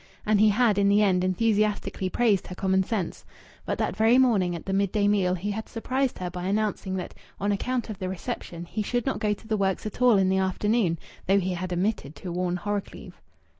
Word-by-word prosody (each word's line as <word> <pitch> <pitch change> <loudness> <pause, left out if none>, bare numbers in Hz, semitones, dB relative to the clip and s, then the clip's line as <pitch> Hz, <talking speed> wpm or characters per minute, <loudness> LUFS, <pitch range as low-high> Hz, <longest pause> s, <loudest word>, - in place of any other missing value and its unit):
And 210 -1 +3
he 215 - +6
had 210 -1 +3
in 200 0 +4
the 205 +1 +4
end 185 -3 +2
enthusiastically 205 -1 0
praised 215 -3 +2
her 180 - -7
common 190 0 +2
sense. 190 -2 -3 0.4
But - - -1
that - - -1
very 225 +3 +4
morning 205 -9 +3
at 170 - -8
the 195 - -2
midday 200 +1 +1
meal 190 -3 +2
he 195 +4 -3
had 220 +2 -5
surprised 260 +3 -1
her 180 -1 -4
by 180 0 -5
announcing 200 -1 -1
that 185 - -5 0.3
on 200 +1 0
account 245 +5 -1
of 215 -4 -7
the 185 - -3
reception 175 -2 -5
he 215 +5 -4
should 245 +3 -1
not 270 - -1
go 210 -2 +1
to 220 - -17
the 220 -1 0
works 195 0 0
at 215 +3 -6
all 245 -4 +6
in 190 -1 +3
the 190 0 +2
afternoon, 190 -1 +1 0.3
though 195 +2 +4
he 185 -1 -1
had 180 +1 -4
omitted 180 -5 -1
to 180 - -7
warn 180 0 -1
Horrocleave. 205 0 -5
200 Hz, 220 wpm, -26 LUFS, 185-215 Hz, 0.4 s, he